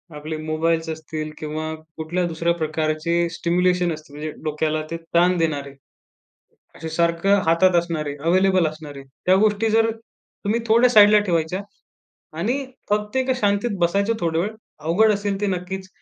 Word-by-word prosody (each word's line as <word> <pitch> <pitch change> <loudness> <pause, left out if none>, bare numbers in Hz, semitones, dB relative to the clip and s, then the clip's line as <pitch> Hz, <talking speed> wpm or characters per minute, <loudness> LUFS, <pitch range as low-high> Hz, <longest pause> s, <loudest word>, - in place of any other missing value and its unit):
आपले 155 +1 -5
मोबाईल्स 160 +1 -1
असतील 155 -1 -5
किंवा 155 +1 -4 0.2
कुठल्या 175 +3 -1
दुसऱ्या 170 +1 0
प्रकारचे 155 +1 -1
स्टिम्युलेशन 175 +1 +1
असतील. 150 -2 -11
म्हणजे 155 +1 -4
डोक्याला 155 0 -1
ते 165 - -2 0.2
ताण 180 +1 +4
देणारे, 145 -4 -1 1.0
असे 160 - -6
सारखं 170 +4 +2
हातात 175 +2 +4
असणारे, 160 -4 -1
अवेलेबल 185 0 +3
असणारे, 150 -3 -8 0.2
त्या 185 - +5
गोष्टी 215 +1 +2
जर 225 +1 +3 0.5
तुम्ही 220 +3 +1
थोड्या 235 +3 +5
साइडला 210 -2 +7
ठेवायच्या 170 +2 0 0.8
आणि 245 +10 -1 0.3
फक्त 210 +3 -1
एका 260 0 +2
शांतीत 205 +1 +1
बसायचं 200 +5 +2
थोडा 165 -1 0
वेळ. 205 +5 -1 0.3
अवघड 185 +8 +3
असेल 200 -1 -2
ते 205 - 0
नक्कीच. 190 0 -4
170 Hz, 140 wpm, -22 LUFS, 155-200 Hz, 1.0 s, साइडला